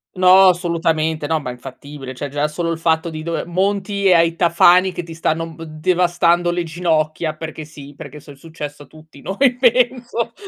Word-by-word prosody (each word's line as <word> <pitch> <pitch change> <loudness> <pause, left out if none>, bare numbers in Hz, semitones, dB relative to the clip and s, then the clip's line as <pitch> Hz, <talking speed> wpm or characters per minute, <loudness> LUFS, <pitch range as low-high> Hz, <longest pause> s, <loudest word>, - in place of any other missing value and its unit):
No, 185 +1 +6
assolutamente. 165 -3 -1
No, 160 +1 0
ma 130 -4 -6
è - - -7
infattibile, 135 +2 -10
cioè 140 +3 -6
già 145 +2 -1
solo 165 +2 -3
il 165 - -3
fatto 165 0 0
di 155 -1 -7
dover 170 0 -4
monti 200 +2 -1
e 185 - +6
hai 170 -1 +4
i 165 - -14
tafani 175 +2 +4
che 175 - -6
ti 165 -1 -10
stanno 165 0 -2
b 165 - -10
devastando 175 +2 +1
le 175 0 -2
ginocchia 160 -1 -1
perché 160 -1 -7
sì, 145 -2 -13
perché 150 - -10
so 145 - -14
è 140 - -13
successo 145 -1 -9
a - - -17
tutti 155 -2 -17
noi 250 +6 +1
penso 245 -1 +1
165 Hz, 200 wpm, -19 LUFS, 155-180 Hz, -, No